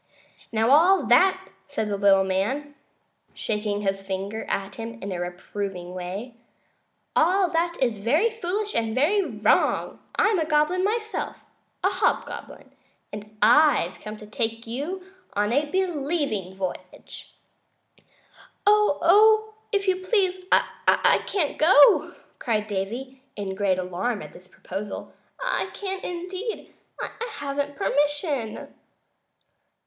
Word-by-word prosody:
"Now, 225 +2 +2
all 350 +7 +5
that," 380 0 +4 0.2
said 280 -7 -2
the 205 - -1
little 195 -1 +4
man, 220 +11 -1 0.6
shaking 210 -1 -2
his 195 -1 -1
finger 195 +3 -4
at 195 0 -2
him 230 0 -7
in 200 -1 -5
a 180 - -3
reproving 180 0 -5
way, 185 +7 -6 0.8
"all 365 +2 +3
that 340 +1 0
is 240 -5 +1
very 300 - +2
foolish 420 0 -3
and 225 -1 -1
very 330 +11 +3
wrong. 215 - +1 0.2
I'm 420 -4 +3
a 320 - 0
goblin 305 +4 +2
myself, 435 +2 -2 0.4
a - - +4
hobgoblin, - - -2 0.4
and 210 +1 -9
I've 295 - +4
come 215 0 -8
to 210 - -11
take 225 +2 -3
you 300 +11 -5 0.3
on 205 +2 0
a 290 +2 +1
Believing 290 - -1
Voyage." 190 -1 -7 1.3
"Oh, 425 +2 +5 0.2
if 400 -2 0
you 370 -1 +3
please, 370 -1 0
I - - +3
can't 345 -8 -1
go!" 310 -3 +6 0.2
cried 215 -4 0
Davy, 235 +7 -4
in 200 -2 -4
great 190 -1 +1
alarm 185 +5 -2
at - - -11
this 180 - -15
proposal; 195 +3 -7 0.3
"I - - -1
can't, 385 -2 -4
indeed. 365 +5 -5 0.3
I - - -4 0.2
haven't 285 0 -3
permission." 290 - -1
265 Hz, 125 wpm, -25 LUFS, -, 1.3 s, go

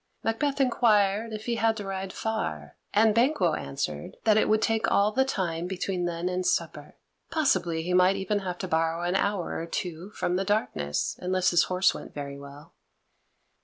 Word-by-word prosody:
Macbeth 275 +6 0
inquired 220 -4 +3
if 215 0 -6
he 235 -1 -1
had 225 0 +2
to 205 - -5
ride 190 0 -4
far, 80 - -4 0.2
and 215 +1 +4
Banquo 230 - +2
answered 75 - -4
that 215 -2 +4
it 215 - +3
would 215 0 +3
take 225 0 +1
all 205 +1 +3
the 265 +5 +3
time 175 -9 -2
between 185 -1 -2
then 170 0 -2
and 185 0 -1
supper - - -2 0.3
possibly 175 - +1
he 180 +2 -2
might 185 +1 +5
even 195 +2 -1
have 180 -2 -4
to 185 - -4
borrow 165 0 0
an 175 - 0
hour 200 -2 -1
or 165 - -5
two 175 +2 -4
from 180 - 0
the 190 - 0
darkness, 75 - -1
unless 185 0 +1
his 175 - +4
horse 185 +1 +2
went - - -10
very 140 -1 -6
well. 140 +4 -12
190 Hz, 185 wpm, -27 LUFS, 170-215 Hz, 0.3 s, might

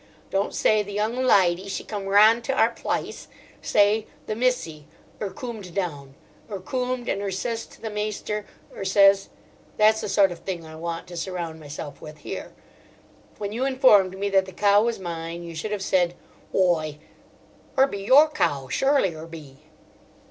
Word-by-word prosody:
Don't 195 +1 0
say 215 -1 +3
'The 205 0 -7
young 215 +3 -1
lydy, 195 -7 +3
she - - -4
came 205 -3 -5
rahnd 215 +4 +6
to 270 - 0
our 230 -3 +3
plice;' - - -4 0.3
say 210 +1 +3 0.2
'The 215 - -3
missy, 215 - -1 0.3
'er 205 - -2
coomed 205 -3 -8
down; 145 -8 -4 0.3
'er 200 -2 -5
coomed, 250 +4 -3
and 195 - -1
'er 200 - -2
ses 225 +5 -3
to - - -18
the 220 - -5
maister, 210 0 -3 0.3
'er - - -5
ses... 195 0 +4 0.2
' - - -30
That's 215 +1 +4
the - - -4
sort 195 -2 +4
of 175 - -7
thing 175 -4 -5
I 160 0 -10
want 165 +1 -5
to 175 - -8
surround 170 -2 -4
myself 145 -1 -8
with 155 0 -10
here. 145 - -7 0.9
When 205 -1 -4
you 235 +4 -2
informed 255 -9 +4
me 200 +1 -1
that 190 -1 +4
the 190 - -10
cow 205 +2 +4
was 235 0 0
mine, 170 -1 -6
you 170 -1 -8
should 165 +7 -5
have 205 -2 -2
said: 175 -2 +1 0.4
'Whoi, 160 -5 +1 0.8
'er 265 - +7
be 200 -7 -5
your 275 +8 +7
cow, 140 - -1
surelie 270 -10 +2
'er 160 +1 -9
be. 150 -5 -11
195 Hz, 180 wpm, -24 LUFS, 170-215 Hz, 0.9 s, er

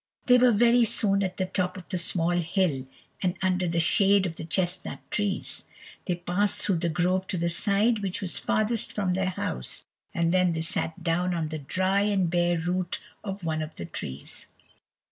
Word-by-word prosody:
They 250 -1 +6
were 250 0 +6
very 235 +2 +5
soon 200 -3 +3
at 185 -2 -2
the 185 - 0
top 185 0 -2
of 180 - -10
the 185 - -1
small 170 0 +1
hill, 170 -5 0 0.3
and 180 -2 0
under 185 -1 +1
the 170 0 0
shade 195 +3 +4
of 165 -3 -3
the - - -7
chesnut 180 +2 -2
trees. 205 -2 -2 0.4
They 180 - 0
passed 180 +4 0
through 195 -4 +1
the 170 +1 0
grove 180 +3 +1
to 185 - -1
the 170 0 0
side 205 +6 +2
which 195 -3 -2
was 190 -3 -2
farthest 215 +1 0
from 195 -3 0
their 190 0 0
house, 65 - -3 0.3
and 170 0 +1
then 180 -2 +3
they 160 - -2
sat 165 0 -4
down 175 +2 +1
on 160 -2 -2
the 155 0 -4
dry 185 +7 +1
and 195 -4 +1
bare 175 0 +2
root 175 +2 -1 0.2
of 195 -2 -5
one 155 -1 -1
of 155 0 -6
the 85 - -6
trees. 70 -4 -6
180 Hz, 195 wpm, -27 LUFS, 170-195 Hz, 0.4 s, They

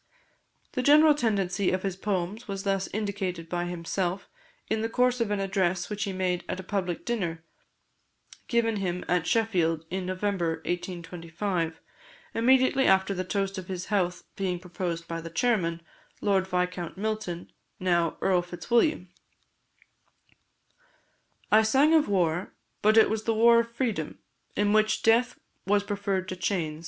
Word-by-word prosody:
The 255 - -1
general 300 +3 +7
tendency 200 -7 0
of 185 0 -1
his 195 -2 -2
poems 195 +3 -3
was 195 -1 -4
thus 195 -1 0
indicated 190 -5 -3
by 175 0 -2
himself, 175 +2 -3 0.4
in 220 0 0
the 225 - -1
course 250 +1 +2
of 230 - 0
an 205 -1 0
address 190 -1 0
which 210 0 -2
he 200 - -3
made 185 -1 -1
at - - -3
a - - -6
public 185 -3 -3
dinner, 175 -9 -2 1.0
given 230 -3 +1
him 180 -2 -2
at 180 -1 +1
Sheffield, 175 -8 +1
in 185 0 -3
November 185 -3 -1
1825, 170 -1 -3 0.5
immediately 260 +3 +4
after 190 +1 +3
the 185 -1 -2
toast 195 +1 -2
of 185 - -9
his 185 -1 -4
health 180 -3 0
being 185 -2 -1
proposed 175 -1 -4
by 165 0 -4
the 165 - -7
chairman, 170 -4 0 0.4
Lord 195 -2 +1
Viscount 180 -1 -2
Milton, 215 -4 -3 0.3
now 175 -3 +1
Earl 185 -2 +3
Fitzwilliam: 185 - 0 2.4
"I 215 +1 +7
sang 270 +8 +4
of 315 -7 +4
war 175 -2 0 0.3
but 215 +1 +4
it 220 - +7
was 220 0 -2
the 225 - +1
war 235 +1 +6
of 230 0 -2
freedom, 230 - -2 0.4
in 205 0 +2
which 215 0 +2
death 230 +3 +3 0.3
was 205 0 +3
preferred 200 -2 -2
to 185 - -3
chains. 165 -5 -2
190 Hz, 150 wpm, -27 LUFS, 175-215 Hz, 2.4 s, general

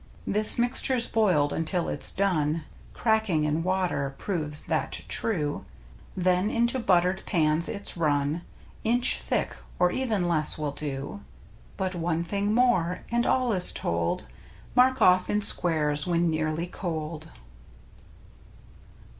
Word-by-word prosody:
This 210 +1 +5
mixture's 245 0 +3
boiled 180 -10 0
until 170 +2 -1
it's - - +5
done 165 -5 -1 0.3
(Cracking 220 -8 -1
in 150 +2 -1
water 175 -7 -2
proves 155 -6 -1
that - - -3
true), 155 -10 -2 0.5
Then 185 +2 0
into 235 +3 +1
buttered 185 -3 0
pans 160 -1 +1
it's 200 -1 +2
run 150 -1 -1 0.4
Inch 240 +2 +3
thick, - - -2 0.2
or 180 0 +1
even 220 -9 -2
less 155 -3 +4
will 150 -2 -4
do; 140 -6 -3 0.6
But 190 -1 -3
one 170 -1 -3
thing 200 +4 -3
more 205 -8 0
— - - -20
and 235 0 0
all 255 -3 0
is 180 -2 +6
told 85 -4 -3 0.2
— - - -24
Mark 260 +1 +3
of¥ 185 -5 +2
in 210 - 0
squares 155 -6 +3
when 170 -1 0
nearly 155 +1 -3
cold. 160 -3 -7
175 Hz, 130 wpm, -25 LUFS, 155-210 Hz, 0.6 s, is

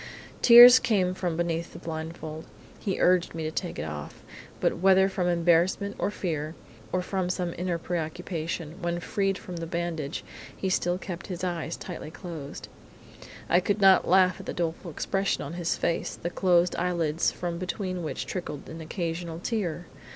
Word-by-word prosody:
Tears 245 +1 +11
came 190 -7 +1
from 180 -3 -2
beneath 170 -1 -2
the - - -8
blindfold, 160 -1 -6 0.3
he 195 -3 -2
urged 180 -2 +3
me 160 - -3
to 155 - -2
take 175 +2 -4
it - - -3
off, 75 -2 -7 0.4
but, - - +1
whether 190 +1 +5
from 190 -2 -1
embarrassment 175 +3 +2
or - - +1
fear, 160 -6 -3 0.4
or 185 0 0
from 185 -1 -2
some 180 -2 -2
inner 175 0 -1
preoccupation, 165 0 -4
when 175 0 -1
freed 195 +2 -1
from 180 -3 -8
the 165 0 -4
bandage 165 -3 -3 0.3
he 190 - -1
still 175 -1 +1
kept 185 -2 -7
his 185 -1 -5
eyes 170 -2 -2
tightly 175 -4 -7
closed. 160 -4 -8 0.8
I 175 - +4
could 200 +3 0
not 195 -1 +6
laugh 185 -1 +4
at - - -10
the - - -3
doleful 170 +1 -3
expression 195 +4 -1
of 145 - -6
his 170 -1 -1
face, 170 - -1
the 175 - -5
closed 175 -1 +3
eyelids 170 -3 +1
from 170 -1 -4
between 185 0 -3
which 155 - -4
trickled 160 -6 -5
an 160 +1 -8
occasional 165 0 -4
tear! 175 -3 -2
175 Hz, 170 wpm, -27 LUFS, 165-185 Hz, 0.8 s, Tears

